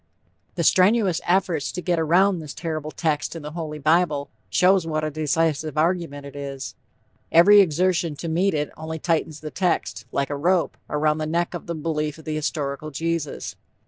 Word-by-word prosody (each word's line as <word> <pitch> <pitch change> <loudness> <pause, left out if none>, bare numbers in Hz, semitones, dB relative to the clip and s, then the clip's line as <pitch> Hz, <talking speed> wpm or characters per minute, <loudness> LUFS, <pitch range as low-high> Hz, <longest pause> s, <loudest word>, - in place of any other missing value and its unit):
The 170 - -1
strenuous 190 +1 +4
efforts 175 -6 +1
to 180 - -4
get 175 -2 0
around 180 +4 +3
this 150 -2 -8
terrible 155 -2 -4
text 155 0 -1
in 165 - -7
the 150 - -6
"Holy 155 -2 -5
Bible," 155 -1 +1 0.2
show 190 +1 +4
what 155 -3 -3
a 155 - -1
decisive 155 0 0
argument 160 -3 0
it 140 - -10
is. 140 -1 -6 0.6
Every 200 +5 +8
exertion 175 -2 +1
to 165 - -6
meet 170 +3 +1
it 150 0 -1
only 160 +1 -5
tightens 160 -1 -1
the 155 -1 -6
text, 175 - -1
like 140 +1 -1
a - - -1
rope, 175 +5 +1
around 150 +1 +1
the 155 - -2
neck 170 +3 -1
of 175 - -7
the 170 - -3
belief 150 -1 -2
in 160 - -14
the 155 - -3
historical 150 -1 -3
Jesus. 165 0 -3
160 Hz, 180 wpm, -23 LUFS, 150-175 Hz, 0.6 s, Every